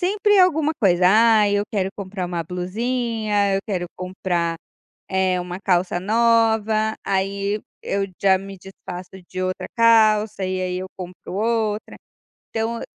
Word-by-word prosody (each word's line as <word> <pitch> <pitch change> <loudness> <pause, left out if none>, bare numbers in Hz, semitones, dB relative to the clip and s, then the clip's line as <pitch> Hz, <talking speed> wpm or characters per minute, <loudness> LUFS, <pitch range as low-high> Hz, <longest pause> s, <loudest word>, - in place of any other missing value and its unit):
sempre 410 +2 +2
alguma 320 -4 +4
coisa, 180 -2 +4
ai 215 0 +5
eu - - +1
quero 195 -3 0
comprar 190 -2 -5
uma 175 -1 -3
blusinha, 210 +3 -1
eu 195 - +1
quero 180 -4 -2
comprar, 175 -2 -2 0.5
eh, 190 -1 +1
uma 180 0 -6
calça 180 -2 +1
nova, 220 0 +2
aí 200 +2 -1 0.2
eu 195 0 -1 0.2
já 190 -1 +5
me 195 0 -9
desfaço 180 -1 -9 0.2
de 185 0 -4
outra 185 0 -3
calça 215 -3 +4
e 185 0 -2
aí 180 0 -2
eu 185 - -5
compro 180 -1 -9
outra, 220 0 -1 0.5
então 225 +1 -2
200 Hz, 140 wpm, -22 LUFS, 185-225 Hz, 0.5 s, ai